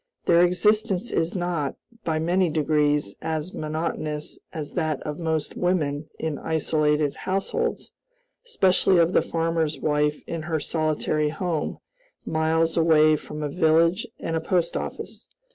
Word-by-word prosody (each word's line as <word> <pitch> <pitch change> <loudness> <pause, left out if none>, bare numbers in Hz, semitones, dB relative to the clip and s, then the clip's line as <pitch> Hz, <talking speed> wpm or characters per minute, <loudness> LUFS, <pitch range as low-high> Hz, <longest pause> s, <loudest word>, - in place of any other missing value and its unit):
Their 170 0 +5
existence 200 +3 +2
is 165 +3 0
not, 175 -6 -1 0.3
by 160 -2 0
many 175 +3 +2
degrees, 150 -6 +1
as 160 +2 -3
monotonous 155 -1 -3
as 155 -3 -5
that 155 -5 -1
of 150 +1 -5
most 160 -2 -2
women 155 -5 0
in 160 -2 -3
isolated 150 -2 +1
households 195 +1 -2 0.5
especially 190 - +3
of 170 +1 +3
the - - +5
farmer's 165 -2 -1
wife 150 0 0
in 165 -1 -4
her 160 0 -2
solitary 155 0 0
home, 160 0 -2 0.5
miles 160 +1 +1
away 155 -2 +5
from 150 0 -6
a - - 0
village 165 +4 +3
and 165 - -3
a 160 - 0
post 170 0 0
office. - - -5
160 Hz, 135 wpm, -25 LUFS, 150-170 Hz, 0.5 s, Their